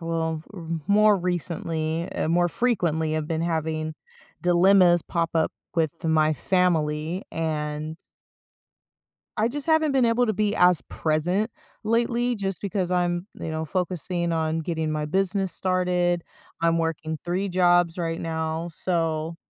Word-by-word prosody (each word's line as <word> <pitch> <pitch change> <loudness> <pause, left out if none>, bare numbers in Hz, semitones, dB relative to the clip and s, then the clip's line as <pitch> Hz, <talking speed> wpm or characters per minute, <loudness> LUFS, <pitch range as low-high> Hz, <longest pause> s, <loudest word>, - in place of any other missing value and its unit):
Well, 165 -1 -2
r 175 -5 -9 0.2
more 210 0 +5
recently, 170 -2 -2
eh - - -1
more 175 +1 +3
frequently 165 -9 0
I've 155 -1 -3
been 160 0 -1
having 160 -1 -2 0.5
dilemmas 180 -1 +5
pop 165 -1 -1
up 160 -1 +1 0.2
with 165 0 -1
my 155 -1 +3
family, 165 0 0
and 155 -1 -3 1.4
I 220 +2 +2
just 285 +3 -5
haven't 315 -2 +3
been 265 -2 +3
able 235 +1 +3
to 215 - +1
be 210 0 0
as 180 -3 +5
present 175 +8 0 0.3
lately, 235 +2 +1
just 195 -3 -2
because 195 -3 -2
I'm, 175 0 0
you 165 - -5
know, 160 0 -2
focusing 175 0 -2
on 160 0 0
getting 160 -1 -2
my 155 0 -1
business 190 +3 0
started, 180 -2 +1 0.4
I'm 165 0 +2
working 160 -1 -2
3 180 +3 -1
jobs 175 -1 +3
right 165 -1 -2
now, 160 0 -2
so, 165 -1 -1
170 Hz, 140 wpm, -25 LUFS, 160-185 Hz, 1.4 s, more